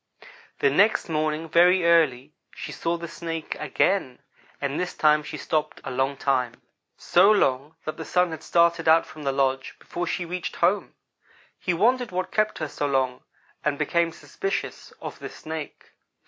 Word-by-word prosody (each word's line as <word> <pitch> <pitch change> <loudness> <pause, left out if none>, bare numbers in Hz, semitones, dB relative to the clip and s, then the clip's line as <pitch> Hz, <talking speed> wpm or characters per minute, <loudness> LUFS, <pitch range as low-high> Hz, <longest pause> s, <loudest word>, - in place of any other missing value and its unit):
"The 140 - +4
next 200 +5 +3
morning 155 0 -1
very 175 +2 +5
early 150 -5 +3 0.2
she - - -6
saw 170 +1 -2
the 170 0 -6
Snake 165 -1 -5
again, 150 -2 0 0.4
and 140 0 -2
this 180 - -3
time 150 0 +4
she 150 - -7
stopped 155 -1 -2
a - - -5
long 135 +2 0
time 125 -4 0 0.4
so 185 +4 +4
long 150 -7 +2
that 155 - -4
the 160 - -5
Sun 180 +1 +1
had 160 -2 -6
started 170 0 +2
out 160 +1 +6
from 155 - -12
the 140 -2 0
lodge 135 -1 0
before 175 0 -5
she 175 - -2
reached 180 +1 -4
home. 185 +4 +1 0.6
He 180 - -1
wondered 245 +6 +2
what 185 0 -3
kept 215 0 +1
her 155 - -3
so 145 0 -3
long, 130 -2 0 0.4
and 150 -1 0
became 165 +3 +1
suspicious 390 - -4
of - - -7
the - - -6
Snake. 160 -1 -8
160 Hz, 170 wpm, -25 LUFS, 140-175 Hz, 0.6 s, out